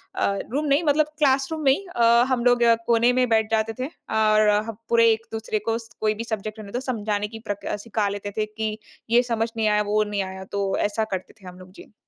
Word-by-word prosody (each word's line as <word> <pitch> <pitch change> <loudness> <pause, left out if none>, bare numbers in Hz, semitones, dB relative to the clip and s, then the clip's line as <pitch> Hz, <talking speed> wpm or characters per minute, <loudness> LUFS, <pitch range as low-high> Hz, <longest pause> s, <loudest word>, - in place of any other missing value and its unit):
अ, - - 0 0.3
room 295 +3 -1
नहीं, 285 +3 +2
मतलब 305 0 +3
classroom 275 +2 +1
में 270 - +6
ही 390 +8 -1
अ, 235 - +2 0.3
हम 250 -2 0
लोग 245 -1 +4 0.2
कोने 235 +1 +4
में 250 - +3
बैठ 220 -1 +2
जाते 220 0 +1
थे 255 - -1 0.3
और 215 0 +3 0.2
पूरे 230 -1 +5
एक-दूसरे 220 -1 -3
को 225 0 +1
स 230 -1 -11
कोई 215 0 +2
भी 230 - -2
सब्जेक्ट 215 -1 -5
रहने 200 -2 -9
तो 245 - -2
समझाने 210 -3 -1
की - - -7
प्रक 205 - -4
अ, - - -1
सिखा 215 -2 0
लेते 205 0 -5
थे 215 - +1
कि 215 0 -4 0.3
ये 240 +2 +4
समझ 225 0 0
नहीं 220 -1 +1
आया, 210 0 +3
वो 210 +1 +1
नहीं 205 -1 -2
आया। 190 0 -7
तो 195 -1 -1
ऐसा 220 +1 -1
करते 185 - -5
थे 190 - -12
हम 180 0 -11
लोग। 185 0 -14
जी। - - -14
220 Hz, 235 wpm, -24 LUFS, 210-235 Hz, 0.3 s, में